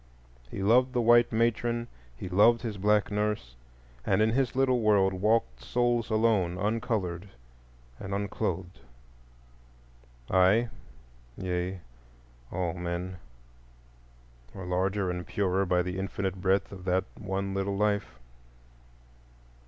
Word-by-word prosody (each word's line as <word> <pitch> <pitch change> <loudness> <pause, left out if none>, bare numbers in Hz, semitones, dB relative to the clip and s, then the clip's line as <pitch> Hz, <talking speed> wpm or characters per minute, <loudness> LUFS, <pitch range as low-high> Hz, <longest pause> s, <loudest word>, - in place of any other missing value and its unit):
He 95 - -5
loved 125 +5 +4
the 125 - +1
white 120 +1 +5
matron, 115 +1 0 0.3
he - - -6
loved 110 +6 +4
his 110 -4 -4
black 105 +1 +2
nurse; 105 - -2 0.5
and 95 +6 +1
in 110 +1 +3
his 130 +1 0
little 130 -2 +3
world 100 -3 +3
walked 95 - +1
souls 120 -1 0
alone, 110 -6 +2
uncolored 105 -3 -2 0.7
and 95 - -7
unclothed. 95 -2 -3 1.5
I—yea, 90 - -1 0.7
all 85 -2 -2
men—are - - -10
larger 95 +1 0
and 90 0 -5
purer 95 -1 0
by 90 0 +2
the 90 +1 -4
infinite 95 -1 -3
breadth 95 +1 +1
of 95 -2 -9
that 95 0 +2 0.2
one 100 -1 -3
little 95 0 -1
life. 100 -10 0
95 Hz, 110 wpm, -28 LUFS, 90-110 Hz, 1.5 s, white